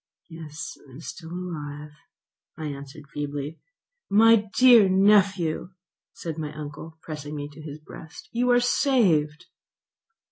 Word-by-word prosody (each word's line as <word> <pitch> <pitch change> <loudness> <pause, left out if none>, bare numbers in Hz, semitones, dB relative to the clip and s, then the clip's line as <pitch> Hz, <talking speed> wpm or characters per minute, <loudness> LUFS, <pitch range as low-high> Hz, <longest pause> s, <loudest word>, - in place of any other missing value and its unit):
"Yes, 160 -1 -8
I 130 - -16
am 135 - -10
still 160 0 -9
alive," 150 -5 -6 0.7
I 160 - -5
answered 140 0 -8
feebly. 145 +1 -4 0.5
"My 215 0 +5
dear 240 -6 +8
nephew," 190 -3 +3 0.4
said 165 -2 -6
my 150 -2 -4
uncle, 155 +2 -8
pressing 150 -1 -6
me 145 -1 -4
to 150 +2 -13
his 150 -1 -8
breast, 160 - -12
"you 245 +1 +1
are 245 0 +6
saved." 190 - +2
160 Hz, 130 wpm, -25 LUFS, 150-200 Hz, 0.7 s, dear